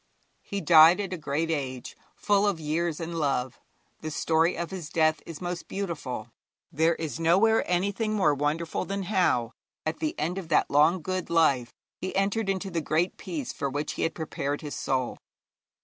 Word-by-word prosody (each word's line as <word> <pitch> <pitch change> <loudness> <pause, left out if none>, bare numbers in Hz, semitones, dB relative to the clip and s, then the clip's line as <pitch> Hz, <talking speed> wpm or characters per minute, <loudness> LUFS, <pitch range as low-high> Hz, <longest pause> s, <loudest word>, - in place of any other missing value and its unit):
He 200 0 -4
died 165 +1 +7
at 195 -2 -3
a - - -3
great 155 +2 -1
age, 130 -5 -4 0.2
full 205 0 +2
of 195 -5 0
years 160 +1 -1
and 165 0 -4
love. 135 -4 -1 0.4
The 155 - -5
story 160 +2 +1
of 170 +1 -4
his 180 -5 -6
death 155 -2 +2
is 165 -3 -7
most 175 0 -4
beautiful. 145 - -4 0.4
There 160 +3 +2
is 160 0 -5
nowhere 195 +7 +4
anything 200 +5 0
more 160 -8 +3
wonderful 150 +4 -1
than 195 0 -3
how, 175 - +1 0.3
at 155 - -2
the 315 +1 -2
end 180 +3 -1
of 180 - -8
that 155 - +2
long 155 +4 +4
good 185 0 -3
life, 140 -8 +3 0.3
he 185 - -4
entered 195 +2 +1
into 195 0 -2
the 170 -1 -1
Great 160 +4 0
Peace 295 -6 -5
for 140 - -2
which 145 +3 -3
he - - -5
had 165 - 0
prepared 145 -3 -3
his 150 -2 -6
soul. 130 -2 -2
165 Hz, 180 wpm, -27 LUFS, 150-185 Hz, 0.4 s, died